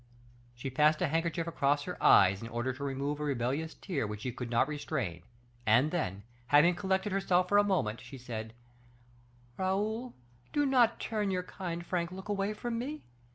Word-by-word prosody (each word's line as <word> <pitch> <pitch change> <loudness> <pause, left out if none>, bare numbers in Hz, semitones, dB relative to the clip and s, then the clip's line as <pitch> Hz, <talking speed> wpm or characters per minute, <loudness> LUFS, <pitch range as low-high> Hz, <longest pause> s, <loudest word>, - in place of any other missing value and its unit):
She 130 +2 -5
passed 150 +3 +4
a - - +3
handkerchief 165 +2 0
across 145 -3 +1
her 180 - -6
eyes, 95 0 +6
in 115 - -6
order 120 +3 -2
to 135 +3 -7
remove 140 +1 -2
a - - -3
rebellious 140 +3 -1
tear 175 - -3
which 105 0 -6
she 125 - -2
could 120 0 -6
not 120 +2 +3
restrain; 120 - -3 0.4
and 120 +7 +4
then, 100 - -2 0.2
having 150 +6 +6
collected 190 +2 -1
herself 185 -2 +2
for 205 - +5
a - - +5
moment, 175 - 0
she 125 +2 -10
said, 110 -3 -6 1.0
"Raoul, 215 +6 -1 0.4
do 290 0 +2
not 250 -4 +4
turn 210 -3 -1
your 185 -1 -1
kind, 175 -2 -5
frank 175 -1 -1
look 190 +2 -9
away 205 +1 -1
from 230 +1 -3
me. 295 +5 -5
160 Hz, 180 wpm, -31 LUFS, 125-195 Hz, 1.0 s, eyes